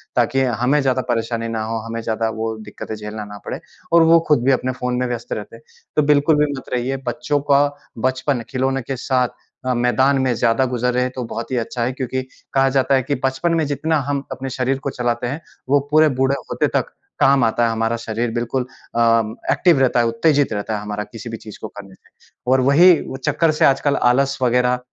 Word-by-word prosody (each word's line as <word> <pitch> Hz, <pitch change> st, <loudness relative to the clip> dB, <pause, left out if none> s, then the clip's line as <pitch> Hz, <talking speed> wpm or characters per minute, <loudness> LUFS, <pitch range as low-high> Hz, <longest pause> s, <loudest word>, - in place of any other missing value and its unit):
ताकि 135 Hz, +2 st, +2 dB, 0.2 s
हमें 140 Hz, +4 st, +3 dB
ज़्यादा 130 Hz, -1 st, +1 dB
परेशानी 115 Hz, 0 st, -1 dB
ना 115 Hz, -1 st, -3 dB
हो, 115 Hz, +1 st, -3 dB
हमें 115 Hz, 0 st, -4 dB
ज़्यादा 110 Hz, 0 st, -1 dB
वो 110 Hz, 0 st, -2 dB
दिक्कतें 110 Hz, 0 st, -7 dB
झेलना 105 Hz, 0 st, -6 dB
ना 105 Hz, 0 st, -9 dB
पड़े। -, -, -4 dB, 0.3 s
और 170 Hz, -1 st, +7 dB
वो 165 Hz, +1 st, +6 dB
खुद 150 Hz, -6 st, +3 dB
भी 135 Hz, -, +4 dB
अपने 130 Hz, 0 st, +1 dB
फ़ोन 125 Hz, 0 st, -1 dB
में 125 Hz, -, 0 dB
व्यस्त 120 Hz, -1 st, -4 dB
रहते -, -, -7 dB
हैं। -, -, -16 dB, 0.3 s
तो -, -, +4 dB
बिल्कुल 150 Hz, +2 st, +4 dB
भी 145 Hz, -, -3 dB
मत 130 Hz, -, -10 dB
रहिए। 125 Hz, +2 st, -1 dB
बच्चों 120 Hz, +4 st, -1 dB
का 140 Hz, +1 st, +6 dB, 0.3 s
बचपन, 130 Hz, +1 st, 0 dB
खिलौने 135 Hz, +1 st, 0 dB
के 135 Hz, +3 st, -4 dB
साथ 125 Hz, -1 st, +1 dB, 0.4 s
अ, 130 Hz, -, +2 dB
मैदान 130 Hz, +3 st, +2 dB
में 130 Hz, -2 st, +1 dB
ज़्यादा 115 Hz, +3 st, +2 dB
गुज़रे 125 Hz, +1 st, +1 dB
तो 130 Hz, -, -3 dB
बहुत 115 Hz, +2 st, -6 dB
ही -, -, 0 dB
अच्छा 120 Hz, +1 st, -2 dB
है 125 Hz, -, 0 dB
क्योंकि 130 Hz, 0 st, -3 dB, 0.3 s
कहा 135 Hz, 0 st, +4 dB
जाता 135 Hz, 0 st, +2 dB
है 130 Hz, -, +2 dB
कि 145 Hz, -, -1 dB
बचपन 135 Hz, +6 st, 0 dB
में 160 Hz, -, +1 dB
जितना 155 Hz, +3 st, 0 dB
हम 140 Hz, -1 st, 0 dB
अपने 135 Hz, 0 st, -5 dB
शरीर 130 Hz, +1 st, -1 dB
को -, -, -3 dB
चलाते 120 Hz, -1 st, -2 dB
हैं 140 Hz, +6 st, -4 dB, 0.3 s
वो 145 Hz, +1 st, +5 dB
पूरे 155 Hz, 0 st, +5 dB
बूढ़े 135 Hz, +1 st, +3 dB, 0.2 s
होते -, -, +1 dB
तक -, -, 0 dB, 0.3 s
काम 135 Hz, -2 st, +4 dB
आता 115 Hz, +1 st, +2 dB
है 115 Hz, -, +1 dB
हमारा 115 Hz, +1 st, 0 dB
शरीर। 115 Hz, +1 st, -3 dB
बिल्कुल 120 Hz, +2 st, -1 dB, 0.3 s
अ, -, -, +1 dB, 0.5 s
एक्टिव 170 Hz, -6 st, +4 dB
रहता 130 Hz, -2 st, +3 dB
है, 120 Hz, -, +3 dB
उत्तेजित 140 Hz, +3 st, +2 dB
रहता 105 Hz, +1 st, -2 dB
है 105 Hz, -, -4 dB
हमारा 105 Hz, 0 st, -4 dB
किसी 115 Hz, +2 st, -9 dB
भी 115 Hz, -, -5 dB
चीज़ 105 Hz, -1 st, -11 dB
को -, -, -4 dB
करने 100 Hz, -2 st, -12 dB
से। -, -, -29 dB, 0.4 s
और 130 Hz, 0 st, +4 dB
वही 145 Hz, +8 st, +6 dB, 0.2 s
वो 130 Hz, -, -6 dB
चक्कर 155 Hz, +4 st, +1 dB
से 155 Hz, -, +2 dB
आजकल 140 Hz, +1 st, +3 dB, 0.2 s
आलस 140 Hz, +2 st, +1 dB
वग़ैरह 125 Hz, 0 st, +2 dB
125 Hz, 220 wpm, -20 LUFS, 115-135 Hz, 0.5 s, और